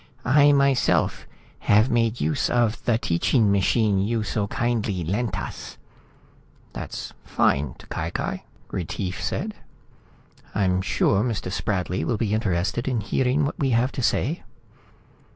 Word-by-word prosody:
"I 145 +3 +6
myself 140 -2 +2 0.4
have 105 +4 +5
made 115 0 +1
use 80 +1 0
of 120 -2 +1
the 115 -2 +3
teaching 105 +4 +2
machine 100 +1 +2
you 110 +3 0
so 105 -1 -1
kindly 110 -6 -1
lent 95 +3 -1
us." - - -7 1.0
"That's - - -6
fine. 70 -2 +1
T'Cai - - -5
Cai," - - -3 0.3
Retief 95 +2 -3
said. 215 +2 -2 1.0
"I'm 95 -2 +2
sure 95 +1 +2
Mr. 110 -6 -2
Spradley 95 -5 -1
will 95 +7 0
be 105 -1 -1
interested 100 +2 0
in 125 -3 0
hearing 130 +7 +1
what 145 - -4
we 135 - +1
have 125 +3 +1
to - - -4
say." 150 +7 0
110 Hz, 135 wpm, -24 LUFS, 95-120 Hz, 1.0 s, I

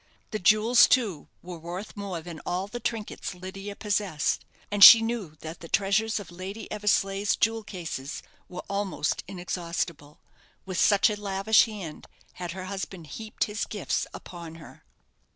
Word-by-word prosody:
The 215 - -2
jewels, 215 +5 +6
too, 210 - +1 0.2
were 175 -1 -8
worth 175 +6 -7
more 195 -5 -5
than 165 -1 -8
all 180 +2 -2
the 210 +4 -7
trinkets 220 -4 -4
Lydia 195 +2 -7
possessed; 200 -7 -1 0.3
and 205 -1 +5
she 230 - +13
knew 225 -8 -3
that 160 +1 -7
the 165 - -9
treasures 205 +4 +1
of 190 -4 -10
Lady 190 +5 -7
Eversleigh's 200 -1 +1
jewel 225 0 +1
cases 165 -8 -6 0.3
were 180 - -7
almost 200 -7 -1
inexhaustible, 170 -4 -4 0.5
with 185 -2 -1
such 205 +2 +5
a 210 0 -5
lavish 200 +2 +4
hand 200 -8 -8 0.3
had 175 -1 -6
her 185 0 -6
husband 190 -3 -6
heaped 215 +9 -4
his 210 +1 -2
gifts 205 -3 -2
upon 170 -2 -9
her. 165 - -14
195 Hz, 150 wpm, -27 LUFS, 175-210 Hz, 0.5 s, she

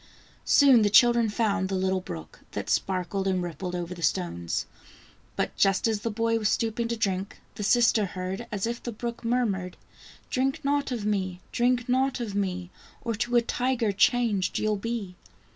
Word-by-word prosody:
Soon 270 -5 +6
the 210 - +3
children 235 +1 +5
found 205 -3 0
the 195 - -1
little 190 0 0
brook, 80 - -8
that - - -3
sparkled 190 +1 -1
and 185 -2 +1
rippled 175 +2 -5
over 175 0 -4
the 175 - -10
stones. 85 - -1 0.7
But - - -2
just 195 +2 +3
as 220 -2 0
the 230 - -2
boy 230 +1 0
was 215 -1 +1
stooping 230 +1 0
to 235 0 -2
drink, 195 -2 -2
the 210 - -7
sister 230 0 +4
heard, 185 +5 -5
as 205 -1 -1
if 235 +1 -3
the 240 - -4
brook 235 +2 -5
murmured: 215 -7 -1 0.3
" - - -21
Drink 270 +4 0
not 285 -1 +1
of 230 -4 -3
me! 190 -4 -1
drink 245 0 +1
not 260 +1 +1
of 225 -4 -4
me! 185 -2 -2 0.3
Or 230 - -1
to 240 +3 -1
a 240 - +5
tiger 245 -2 0
changed 205 -2 +2
you'll 215 0 +1
be." 205 -3 -4
210 Hz, 180 wpm, -27 LUFS, 190-235 Hz, 0.7 s, Soon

